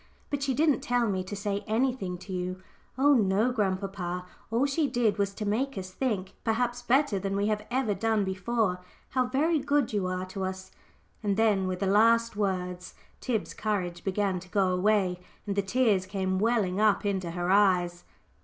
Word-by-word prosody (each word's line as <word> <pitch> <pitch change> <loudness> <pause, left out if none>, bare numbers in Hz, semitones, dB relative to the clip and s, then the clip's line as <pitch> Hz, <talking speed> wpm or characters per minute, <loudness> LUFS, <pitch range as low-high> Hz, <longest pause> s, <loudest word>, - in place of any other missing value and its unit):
"But 285 -1 -1
she 275 -2 0
didn't 300 0 +3
tell 245 -1 +1
me 190 -2 -1
to 190 +3 -6
say 200 0 -2
anything 220 -5 0
to 190 +2 -9
you 185 +1 -4 0.3
oh 285 +2 +5
no, 215 0 +3
grandpapa. 190 -4 -2 0.2
All 230 +5 +2
she 285 +2 +1
did 235 -5 +1
was 200 -1 +1
to 210 - -4
make 245 +6 -1
us 185 -1 -5
think 195 -4 -2
perhaps 240 +2 0
better 245 -3 +2
than 195 +1 -2
we 200 +1 +1
have 210 0 -2
ever 250 -4 +1
done 220 0 +1
before 190 0 -1 0.3
how 255 -1 +1
very 300 +5 +2
good 285 -3 +1
you 200 -3 0
are 185 0 -2
to 190 +1 -5
us;" 190 0 -5 0.5
and 205 -2 0
then, 210 -4 +3
with 185 0 -3
the - - +1
last 230 +3 +4
words 180 -3 -2 0.2
Tib's 230 -5 -2
courage 180 -5 -2
began 195 -1 0
to 185 +1 -14
go 195 -1 +2
away, 185 -1 +2 0.3
and 200 -2 -2
the 200 - +2
tears 200 -2 +1
came 190 -1 -1
welling 210 -4 +1
up 210 -1 +3
into 190 -3 -1
her 175 +2 -1
eyes. 180 -3 +3
205 Hz, 185 wpm, -28 LUFS, 185-235 Hz, 0.5 s, oh